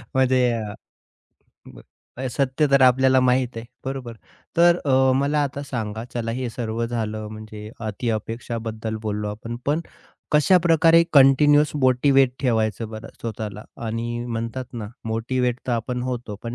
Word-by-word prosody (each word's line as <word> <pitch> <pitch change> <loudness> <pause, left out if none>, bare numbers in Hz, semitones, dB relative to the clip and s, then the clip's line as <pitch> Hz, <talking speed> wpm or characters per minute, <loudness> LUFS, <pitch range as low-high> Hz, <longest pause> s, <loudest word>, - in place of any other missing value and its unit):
म्हणजे 130 -1 +3
अ, 110 -3 -3 0.9
म - - -13 0.5
सत्य 135 +3 +1
तर 140 0 +5
आपल्याला 130 +1 +5
माहीत 125 -1 +1
आहे, 115 - -5 0.2
बरोबर. 130 -3 -5 0.4
तर 170 0 +6
अ, 130 -2 +4
मला 145 +2 +1
आता 140 0 -3
सांगा 110 -5 -4
चला 115 -1 -2
हे 125 +1 -3
सर्व 115 -1 -3
झालं 110 -2 -3
म्हणजे 110 0 -9 0.2
अतिअपेक्षाबद्दल 110 0 -4
बोललो 105 -1 -2
आपण, 110 +3 -6
पण 150 +3 +1 0.5
कशाप्रकारे 165 +1 +5
कंटिन्युअस 145 +2 +6
मोटिव्हेट 135 0 +4
ठेवायचं 110 -3 0
बरं 110 0 -8
स्वतःला. 105 -2 -5 0.2
आणि 120 +1 -3
म्हणतात 115 +2 -4
ना 115 -4 -5 0.2
मोटिव्हेट 120 +2 -1
तर 125 - 0
आपण 125 +2 -2
होतो, 125 -4 -4
पण 115 0 -5
120 Hz, 135 wpm, -23 LUFS, 110-135 Hz, 0.9 s, तर